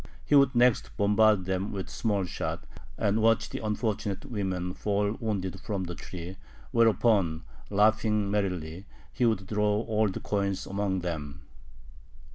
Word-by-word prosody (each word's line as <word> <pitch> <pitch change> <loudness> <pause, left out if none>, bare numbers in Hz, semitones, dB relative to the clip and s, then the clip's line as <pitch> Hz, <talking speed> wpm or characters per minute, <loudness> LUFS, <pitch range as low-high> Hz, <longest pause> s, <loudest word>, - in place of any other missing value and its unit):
He - - -1
would 140 -3 +5
next 120 -1 +3
bombard 105 -1 +4
them 95 +2 -2
with 95 -2 -4
small 100 -4 -1
shot, - - -4 0.3
and 105 +2 +1
watch 115 0 +2
the - - -5
unfortunate 105 0 -2
women 95 -7 -3
fall 100 0 0
wounded 95 -4 -3
from 100 -2 -3
the 90 -1 -5
tree, 90 +1 -8 0.3
whereupon, 105 -7 +3 0.3
laughing 105 0 +2
merrily, 90 -3 -2 0.3
he 125 - +2
would 100 -4 0
throw 105 +1 +1
gold 110 -3 0
coins 100 -2 -1
among 100 -1 -1
them. 75 -5 -5
100 Hz, 135 wpm, -28 LUFS, 95-110 Hz, 0.3 s, would